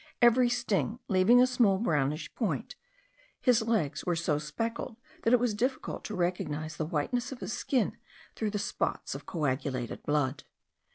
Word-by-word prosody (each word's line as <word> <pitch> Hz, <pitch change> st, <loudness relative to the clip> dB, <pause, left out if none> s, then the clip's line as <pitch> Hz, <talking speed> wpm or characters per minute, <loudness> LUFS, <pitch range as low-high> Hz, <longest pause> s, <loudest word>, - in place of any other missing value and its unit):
Every 240 Hz, 0 st, +6 dB
sting 235 Hz, -2 st, 0 dB
leaving 195 Hz, +5 st, +6 dB
a -, -, +6 dB
small 240 Hz, -6 st, +3 dB
darkish 150 Hz, -7 st, 0 dB
brown -, -, 0 dB
point, -, -, -4 dB, 0.6 s
his 245 Hz, -3 st, +4 dB
legs 220 Hz, -10 st, 0 dB
were 175 Hz, -, 0 dB
so 160 Hz, -3 st, 0 dB
speckled 225 Hz, +9 st, -4 dB, 0.2 s
that 230 Hz, -, +2 dB
it 250 Hz, -, +6 dB
was 240 Hz, -2 st, +1 dB
difficult 255 Hz, +5 st, -2 dB
to 215 Hz, -, -4 dB
recognize 155 Hz, -4 st, -2 dB
the 155 Hz, -, -2 dB
whiteness 240 Hz, -, -1 dB
of 265 Hz, -, -7 dB
his -, -, -4 dB
skin 255 Hz, -5 st, 0 dB, 0.4 s
through 220 Hz, -, -1 dB
the 205 Hz, -, -2 dB
spots -, -, -2 dB
of -, -, -8 dB
coagulated 130 Hz, -5 st, -2 dB
blood. 145 Hz, -2 st, 0 dB
200 Hz, 165 wpm, -30 LUFS, 150-235 Hz, 0.6 s, Every